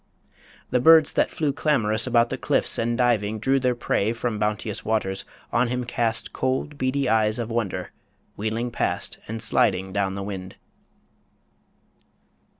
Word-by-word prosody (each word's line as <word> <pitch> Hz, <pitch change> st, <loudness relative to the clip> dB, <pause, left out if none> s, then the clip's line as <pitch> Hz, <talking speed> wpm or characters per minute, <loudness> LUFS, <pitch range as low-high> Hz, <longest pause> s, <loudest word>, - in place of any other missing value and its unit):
The 125 Hz, -, +3 dB
birds 160 Hz, +3 st, +6 dB
that -, -, +2 dB
flew 150 Hz, -3 st, -1 dB
Clamorous 115 Hz, -7 st, +1 dB
about 120 Hz, 0 st, +3 dB
the -, -, -2 dB
cliffs, -, -, 0 dB
and 115 Hz, +1 st, 0 dB
diving 110 Hz, -4 st, +1 dB
drew 135 Hz, +5 st, +2 dB
Their 125 Hz, -1 st, +1 dB
prey 110 Hz, -2 st, 0 dB
from 115 Hz, -2 st, -3 dB
bounteous 105 Hz, 0 st, -2 dB
waters, 105 Hz, -3 st, -1 dB, 0.3 s
on 125 Hz, -, +3 dB
him 125 Hz, +1 st, -2 dB
cast 115 Hz, -2 st, -1 dB
Cold, 130 Hz, +3 st, -2 dB
beady 130 Hz, +1 st, 0 dB
eyes 110 Hz, -1 st, +2 dB
of 120 Hz, -1 st, -4 dB
wonder, 115 Hz, -5 st, -2 dB, 0.4 s
wheeling 110 Hz, +3 st, -2 dB
past -, -, -2 dB
And 115 Hz, +1 st, -4 dB
sliding 95 Hz, -3 st, +1 dB
down 100 Hz, -1 st, 0 dB
the 100 Hz, -, -4 dB
wind. 95 Hz, -2 st, -6 dB
115 Hz, 150 wpm, -24 LUFS, 105-125 Hz, 0.4 s, birds